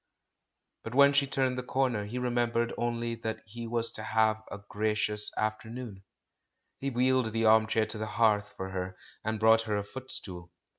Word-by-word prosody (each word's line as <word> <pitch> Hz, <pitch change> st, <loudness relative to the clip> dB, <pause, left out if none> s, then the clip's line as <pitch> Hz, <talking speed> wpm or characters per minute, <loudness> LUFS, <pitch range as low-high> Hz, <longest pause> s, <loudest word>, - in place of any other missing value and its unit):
But 115 Hz, +2 st, -6 dB
when 140 Hz, +1 st, +7 dB
she 140 Hz, 0 st, +3 dB
turned 130 Hz, -2 st, 0 dB
the -, -, -4 dB
comer 125 Hz, -5 st, 0 dB
he 115 Hz, +5 st, -6 dB
remem 120 Hz, -1 st, 0 dB
bered 115 Hz, 0 st, 0 dB
only 120 Hz, 0 st, -2 dB
that 115 Hz, -1 st, -5 dB
he 115 Hz, +2 st, -7 dB
was 115 Hz, 0 st, +3 dB
to -, -, -4 dB
have 110 Hz, 0 st, +1 dB
a -, -, -5 dB
gracious 105 Hz, 0 st, +1 dB
after 110 Hz, +1 st, -2 dB
noon. 115 Hz, -5 st, -8 dB, 0.8 s
He 140 Hz, -, -2 dB
wheeled 130 Hz, -2 st, +2 dB
the 115 Hz, 0 st, +1 dB
armchair 110 Hz, 0 st, +4 dB
to 110 Hz, 0 st, -5 dB
the 110 Hz, -, -3 dB
hearth 105 Hz, -2 st, +1 dB
for 95 Hz, 0 st, -5 dB
her, 90 Hz, 0 st, -4 dB, 0.3 s
and 110 Hz, 0 st, -2 dB
brought 110 Hz, +1 st, +5 dB
her 105 Hz, -, +1 dB
a 100 Hz, -, -1 dB
footstool. 100 Hz, -8 st, -6 dB
110 Hz, 185 wpm, -29 LUFS, 105-120 Hz, 0.8 s, when